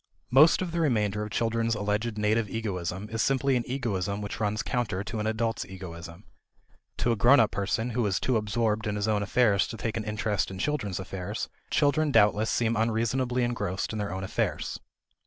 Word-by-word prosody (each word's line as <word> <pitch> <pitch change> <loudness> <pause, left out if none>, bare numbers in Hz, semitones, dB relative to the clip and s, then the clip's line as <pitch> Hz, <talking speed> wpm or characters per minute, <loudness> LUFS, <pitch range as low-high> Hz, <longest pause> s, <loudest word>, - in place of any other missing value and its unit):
Most 155 +8 +6
of 175 - -4
the 170 - -2
remainder 105 -9 +1
of 105 - -4
children's 115 +1 0
alleged 105 +2 -1
native 105 0 +1
egoism 95 -3 -3
is 115 0 -1
simply 135 +2 +2
an 120 - +1
egoism 100 -7 -2
which 105 +1 -5
runs 105 0 0
counter 105 -6 -1
to 110 +1 -5
an 105 - -1
adult's 115 0 -1
egoism. 85 -1 -9 0.7
To 120 - +1
a - - +2
grown 120 +7 +6
up 115 - +4
person 110 +4 -1
who 120 +1 0
is 95 -2 0
too 130 - 0
absorbed 110 0 0
in 105 - -1
his 105 +1 -1
own 105 -2 +1
affairs 100 -1 +3
to 115 - -7
take 115 -1 -3
an 110 - -2
interest 105 -1 -1
in 95 - -7
children's 105 - -2
affairs, 95 -1 -5 0.2
children 145 +2 +2
doubtless 105 -2 +4
seem 115 -1 +1
unreasonably 115 +3 0
engrossed 115 -5 -2
in 110 - -3
their 100 -2 -2
own 95 +1 -4
affairs. 95 - -2
110 Hz, 195 wpm, -28 LUFS, 100-120 Hz, 0.7 s, Most